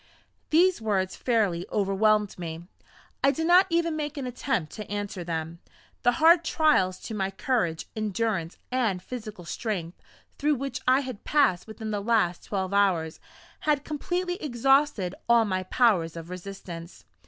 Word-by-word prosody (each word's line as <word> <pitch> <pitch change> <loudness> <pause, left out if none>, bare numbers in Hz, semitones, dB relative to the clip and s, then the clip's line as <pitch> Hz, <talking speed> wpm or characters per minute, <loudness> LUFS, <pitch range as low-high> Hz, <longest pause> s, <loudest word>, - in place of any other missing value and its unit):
These 345 -2 +4
words 195 -4 0
fairly 205 -8 +1
overwhelmed 210 0 +2
me. 165 0 -6 0.6
I 275 - +6
did 320 +3 -1
not 360 +3 +6
even 335 -1 +1
make 300 -1 -4
an 275 - -3
attempt 250 - -2
to 210 -2 -8
answer 205 -3 -4
them. 165 0 -4 0.4
The 245 - +3
hard 330 +4 +5
trials 300 - +2
to 225 - -6
my 195 -2 -1
courage, 195 -7 -1
endurance, 215 -5 -2
and 230 -8 +1
physical 215 -7 -7
strength, 180 -3 -4 0.4
through 300 0 +2
which 275 +1 -4
I 260 +2 +5
had 255 -6 -7
passed 270 -13 +2
within 220 0 -6
the 205 -1 -2
last 205 -5 +1
twelve 190 -1 -2
hours, 180 -6 +2 0.4
had 295 -2 0
completely 355 +4 -2
exhausted 270 - +2 0.2
all 235 -1 +6
my 185 -2 -1
powers 185 -5 +2
of 165 +1 -8
resistance. 180 -2 -8
215 Hz, 150 wpm, -27 LUFS, 185-275 Hz, 0.6 s, I